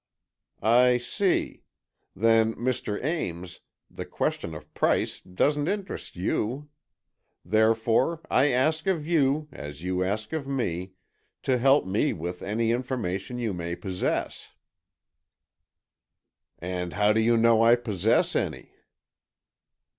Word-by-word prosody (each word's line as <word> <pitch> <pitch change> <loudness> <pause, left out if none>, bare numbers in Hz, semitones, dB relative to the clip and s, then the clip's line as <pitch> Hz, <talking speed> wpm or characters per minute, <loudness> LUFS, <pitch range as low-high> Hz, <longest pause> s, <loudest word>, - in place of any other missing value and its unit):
"I 125 +2 +5
see; 180 - -1 0.5
then, 115 +1 +3
Mr. 120 -4 -2
Ames, 90 - -3 0.3
the - - -7
question 80 -1 -3
of - - -12
price - - +1
doesn't 145 +11 0
interest 200 0 -4
you. 120 +10 -2 0.8
Therefore, 110 - +2
I 135 +3 +3
ask 155 +6 +1
of 170 -6 0
you, 150 -2 +1
as 75 +1 -9
you 90 0 0
ask 105 +8 -3
of 150 -4 -3
me, 95 -9 -3 0.5
to 130 -2 +1
help 135 +3 +4
me 100 +10 +1
with 90 +2 -6
any 110 +3 0
information 120 -3 -3
you 115 -4 -2
may 85 -1 -4
possess." 95 -1 -3 2.0
"And 90 0 -4
how 105 +2 +3
do 110 - +2
you 115 +1 +3
know 115 0 +4
I 115 +1 +6
possess 110 -3 +1
any?" - - -2
115 Hz, 115 wpm, -26 LUFS, 95-135 Hz, 2.0 s, I